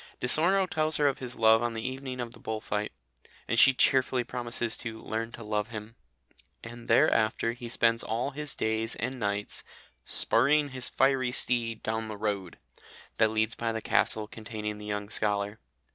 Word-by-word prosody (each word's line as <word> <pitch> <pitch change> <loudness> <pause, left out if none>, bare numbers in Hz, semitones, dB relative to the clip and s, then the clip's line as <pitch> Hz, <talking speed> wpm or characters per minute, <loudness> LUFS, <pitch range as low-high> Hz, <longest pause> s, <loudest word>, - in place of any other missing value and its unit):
Di - - -3
Sorno 185 +8 +4
tells 155 -2 -1
her 145 - +3
of 140 0 0
his 125 -1 -4
love 110 0 +5
on 120 -1 -1
the 110 +2 -3
evening 130 -1 -5
of 120 -1 -4
the - - -14
bull 110 0 -4
fight, 105 -1 -3 0.6
and 115 - +2
she 135 - +8
cheerfully 130 -1 +2
promises 120 -1 -2
to 115 -2 -6
"learn 115 +1 -4
to 115 - -9
love 105 0 -1
him," 110 -1 -8 0.7
and 120 0 -10
therafter 115 0 +3
he 120 -1 -8
spends 115 -1 +2
all 115 +5 -2
his 150 0 -4
days 110 0 -1
and 125 +2 -4
nights 100 -1 -2 0.4
"spurring 145 +5 +3
his 130 -2 -2
fiery 135 -1 +2
steed 115 -2 +1
down 110 0 -2
the 110 -1 -6
road" 100 -4 -3 0.6
that 110 -1 +4
leads 110 +1 0
by 115 -1 -2
the 110 - -3
castle 110 0 +1
containing 105 -1 -6
the 105 - -9
young 105 0 -3
scholar. 105 0 -1
115 Hz, 180 wpm, -28 LUFS, 110-125 Hz, 0.7 s, she